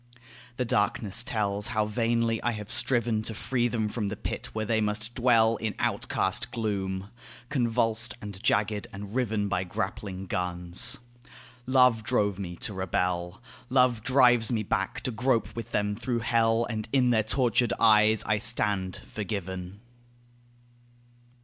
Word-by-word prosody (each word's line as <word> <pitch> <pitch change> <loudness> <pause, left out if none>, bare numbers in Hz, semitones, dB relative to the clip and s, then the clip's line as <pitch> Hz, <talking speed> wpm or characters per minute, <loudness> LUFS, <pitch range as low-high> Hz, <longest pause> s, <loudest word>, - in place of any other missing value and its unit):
The 125 - -1
darkness 105 0 +2
tells 105 -3 -1
how 110 -2 0
vainly 115 +1 0
I 120 - -1
have 105 -1 -7
striven 120 -4 +2
To 110 0 -4
free 120 +2 0
them 110 -2 -1
from 105 -1 -3
the 105 - -4
pit - - -5
where 110 0 -3
they 110 0 0
must 110 +2 -2
dwell 115 -2 +3
In 110 -1 -4
outcast - - 0
gloom 100 -3 -3 0.4
convulsed 115 -3 +1
and 100 -2 -8
jagged 105 -2 0
and 100 +1 -9
riven 110 -5 -1
By 100 -2 -1
grappling 95 +1 -5
guns. 90 -1 +2 0.7
Love 125 -3 +4
drove 105 -5 0
me 90 -3 -6
to 105 - -1
rebel. 90 +1 -2 0.3
Love 125 -3 +3
drives 120 -2 +4
me 110 -3 -1
back 95 -1 -2
to 130 - -3
grope 125 0 0
with 115 - -6
them 105 0 -1
through 120 +1 -2
hell; 115 0 +2
And 110 -1 -5
in 125 -3 +3
their 110 -2 +3
tortured 120 +2 +1
eyes 110 -1 +5
I 110 0 0
stand 105 -5 +1
forgiven. 95 -2 -6
110 Hz, 145 wpm, -27 LUFS, 100-120 Hz, 0.7 s, eyes